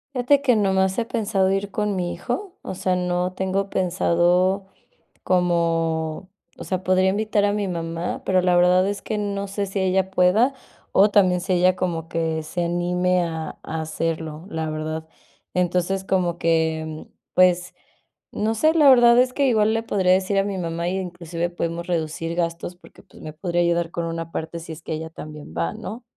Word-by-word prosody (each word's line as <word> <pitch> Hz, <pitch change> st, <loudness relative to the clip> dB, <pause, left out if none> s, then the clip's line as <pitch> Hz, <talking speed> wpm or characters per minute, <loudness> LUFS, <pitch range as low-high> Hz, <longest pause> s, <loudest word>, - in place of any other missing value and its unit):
Fíjate 260 Hz, +3 st, +3 dB
que 250 Hz, -5 st, +3 dB
nomás 190 Hz, -2 st, +2 dB
he 230 Hz, -, 0 dB
pensado 200 Hz, -4 st, 0 dB
ir 195 Hz, +1 st, -1 dB
con 210 Hz, -1 st, -1 dB
mi 175 Hz, -2 st, -2 dB
hijo, 380 Hz, +10 st, -5 dB
o -, -, -5 dB
sea, 185 Hz, -1 st, 0 dB
no 180 Hz, 0 st, -1 dB
tengo 190 Hz, +1 st, -2 dB
pensado 180 Hz, +1 st, +2 dB, 0.6 s
como 165 Hz, -1 st, 0 dB, 0.3 s
o -, -, -8 dB
sea, 185 Hz, -1 st, -2 dB
podría 185 Hz, 0 st, +3 dB
invitar 210 Hz, +1 st, +1 dB
a 205 Hz, -, +2 dB
mi 205 Hz, -1 st, -1 dB
mamá, 165 Hz, -1 st, -4 dB
pero 185 Hz, -1 st, +3 dB
la 180 Hz, -1 st, +2 dB
verdad 180 Hz, +2 st, +4 dB
es 205 Hz, 0 st, -4 dB
que 215 Hz, -, -3 dB
no 200 Hz, -1 st, -3 dB
sé 200 Hz, +1 st, -2 dB
si 195 Hz, 0 st, -3 dB
ella 190 Hz, 0 st, +1 dB
pueda, 190 Hz, +8 st, +3 dB, 0.4 s
o 205 Hz, +2 st, +5 dB
también 185 Hz, -3 st, +4 dB
si 190 Hz, -, -1 dB
ella 180 Hz, +1 st, +3 dB
como 170 Hz, -3 st, -2 dB
que 160 Hz, -1 st, -1 dB
se 165 Hz, +3 st, -3 dB
anime 180 Hz, +1 st, +1 dB
a 160 Hz, -1 st, -5 dB
a 160 Hz, 0 st, -4 dB
hacerlo, 160 Hz, 0 st, -4 dB
la 160 Hz, -4 st, -3 dB
verdad. 155 Hz, +1 st, -4 dB, 0.5 s
Entonces, 180 Hz, +1 st, 0 dB
como 180 Hz, -3 st, 0 dB
que, 160 Hz, -1 st, +1 dB, 0.2 s
mm, -, -, -35 dB, 0.2 s
pues, 180 Hz, -1 st, +3 dB, 0.6 s
no 220 Hz, +2 st, -1 dB
sé, 310 Hz, +8 st, +3 dB
la 300 Hz, -3 st, +6 dB
verdad 240 Hz, -2 st, +7 dB
es 250 Hz, 0 st, +3 dB
que 280 Hz, 0 st, +2 dB
igual 220 Hz, -2 st, +3 dB
le 225 Hz, -, 0 dB
podría 190 Hz, -5 st, +2 dB
decir 190 Hz, +1 st, +2 dB
a 195 Hz, -, +3 dB
mi 200 Hz, -1 st, -3 dB
mamá 170 Hz, 0 st, -2 dB
y, 190 Hz, +2 st, -1 dB
inclusive, 175 Hz, -1 st, -4 dB
podemos 170 Hz, 0 st, -3 dB
reducir 165 Hz, -1 st, -2 dB
gastos 170 Hz, +1 st, -2 dB
porque, 175 Hz, -, -18 dB
pues, -, -, -17 dB
me 155 Hz, -, -7 dB
podría 175 Hz, +1 st, -1 dB
ayudar 170 Hz, -1 st, +1 dB
con 170 Hz, 0 st, -3 dB
una 165 Hz, 0 st, -4 dB
parte 160 Hz, +1 st, -4 dB
si 165 Hz, 0 st, -8 dB
es 160 Hz, -, -9 dB
que 160 Hz, -, -4 dB
ella 160 Hz, +1 st, -5 dB
también 150 Hz, -, -10 dB
va, 85 Hz, 0 st, -1 dB
¿no? 225 Hz, +5 st, -7 dB
180 Hz, 190 wpm, -23 LUFS, 165-195 Hz, 0.6 s, verdad